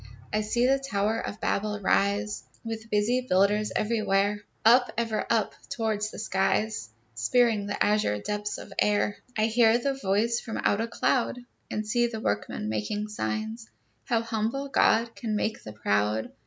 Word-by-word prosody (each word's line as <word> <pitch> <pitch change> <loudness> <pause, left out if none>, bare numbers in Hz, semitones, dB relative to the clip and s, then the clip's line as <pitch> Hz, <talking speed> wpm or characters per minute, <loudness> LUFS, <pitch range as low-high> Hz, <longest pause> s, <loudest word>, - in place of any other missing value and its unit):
I 215 - +2
see 235 +3 +1
the 270 +1 +3
tower 220 -4 0
of 205 - -5
Babel 210 +1 -1
rise, 205 +1 +1 0.2
With 225 -1 -6
busy 220 +5 +2
builders 205 +3 +3
everywhere, 205 -2 +1 0.2
Up, 245 +2 +6
ever 225 -2 -1
up, 225 -3 +1 0.2
towards 215 -2 -1
the - - -10
skies, 210 - 0 0.2
Spearing 210 - +2
the 205 - 0
azure 210 - +2
depths 210 - -3
of 200 - -10
air. 205 0 +2 0.2
I 215 - +3
hear 230 +1 +4
a 275 - +2
voice 230 -1 +1
from 225 - -6
out 205 - +2
a 230 - -1
cloud, 245 +1 0 0.3
And 215 0 -3
see 240 +3 +2
the 225 -2 -5
workmen 105 - -2
making 110 - -2
signs, 215 - -4 0.4
How 230 -1 +1
humble 230 +5 -2
God 230 -3 +3
can 220 -3 -3
make 215 +1 -1
the 110 - -9
proud! 105 +1 0
215 Hz, 160 wpm, -27 LUFS, 205-230 Hz, 0.4 s, Up